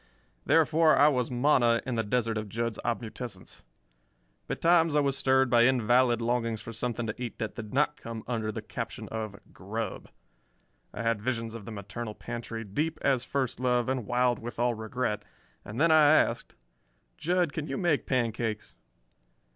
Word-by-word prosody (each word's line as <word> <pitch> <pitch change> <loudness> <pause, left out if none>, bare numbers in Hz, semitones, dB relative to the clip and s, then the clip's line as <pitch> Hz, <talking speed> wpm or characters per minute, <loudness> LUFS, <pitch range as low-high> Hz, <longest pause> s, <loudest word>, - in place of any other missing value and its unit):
Therefore, 160 0 +5
I 145 - +7
was 125 -4 0
manna 120 -2 +3
in 130 - -2
the 115 - +1
desert 115 +1 0
of 105 -1 -4
Jud's 115 +1 -3
obmutescence. 115 -3 -5 0.9
Betimes 165 -2 +3
I - - +5
was 140 -2 +1
stirred 130 0 +3
by 120 -1 +5
invalid 120 -1 +3
longings 115 -2 0
for 115 +2 -8
something 120 +1 -2
to 110 +2 -5
eat 120 -2 -5
that 110 - -4
did 110 -3 -8
not 150 +2 +1
come 115 -1 -7
under 110 -3 -2
the - - -6
caption - - -6
of 110 -3 -5
"grub." 105 +2 -5 0.8
I - - -5
had 115 -2 0
visions 115 -1 -2
of 115 -3 -8
the 115 - -7
maternal 105 +2 -6
pantry 115 -1 -6
"deep 150 +11 -2
as 130 -3 +2
first 130 -2 -2
love, 125 -2 +1
and 130 -5 -2
wild 125 0 +2
with 120 -1 -7
all 120 +1 +2
regret," 110 -1 -2 0.4
and 105 +4 -7
then 165 +1 +4
I 155 -2 +7
asked: - - +1 0.6
"Jud, 175 -2 +1
can 155 -1 -4
you 135 - -3
make 170 -5 +1
pancakes?" 115 -4 -1
120 Hz, 170 wpm, -29 LUFS, 115-130 Hz, 0.9 s, I